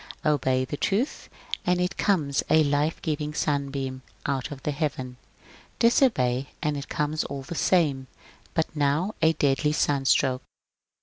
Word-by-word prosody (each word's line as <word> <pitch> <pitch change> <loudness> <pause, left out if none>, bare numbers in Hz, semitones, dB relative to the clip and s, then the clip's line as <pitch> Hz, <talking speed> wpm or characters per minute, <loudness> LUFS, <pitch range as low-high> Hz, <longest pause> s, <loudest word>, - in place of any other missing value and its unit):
Obey 130 -3 +2
the 145 +3 -5
truth, 220 - -1 0.3
and 180 0 +2
it 180 +1 0
comes 155 -9 +1
a 155 0 +6
life 145 +2 +1
giving 150 -1 -2
sun 140 -3 0
beam 135 -1 -4 0.2
out 135 -2 -1
of 140 -2 -9
heaven; 140 -4 -2 0.6
disobey, 140 - +3
and 150 -1 -1
it 140 0 -6
comes 150 +1 -1
all 140 -1 -5
the 140 - -6
same, 150 -7 +2 0.5
but 160 0 -1
now 150 +8 +1
a 160 +1 +5
deadly 145 0 +2
sunstroke. 135 -3 +2
145 Hz, 140 wpm, -26 LUFS, 135-160 Hz, 0.6 s, a